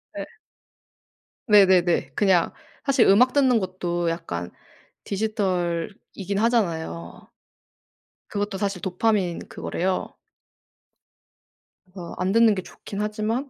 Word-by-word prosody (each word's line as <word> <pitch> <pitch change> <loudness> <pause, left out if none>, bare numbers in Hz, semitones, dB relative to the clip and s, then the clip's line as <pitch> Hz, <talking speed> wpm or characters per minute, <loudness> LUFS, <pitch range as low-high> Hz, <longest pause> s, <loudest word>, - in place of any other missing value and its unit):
네. - - -4 1.2
네네네. 190 -4 +4
그냥 190 -4 +3 0.3
사실 270 -4 +4
음악 245 +6 +5
듣는 260 -5 +4
것도 175 -2 -2
약간 90 - -4 0.5
디지털이긴 195 -1 -2
하잖아요. 165 - -1 1.0
그것도 205 -1 -3
사실 200 -3 -2
도파민 185 -1 0
그거래요. 185 +1 -3 1.7
그래서 180 -2 -9
안 185 +1 0
듣는 225 -1 +5
게 185 - -3
좋긴 200 +2 -8
하지만 215 +6 -2
195 Hz, 220 characters per minute, -24 LUFS, 175-215 Hz, 1.7 s, 음악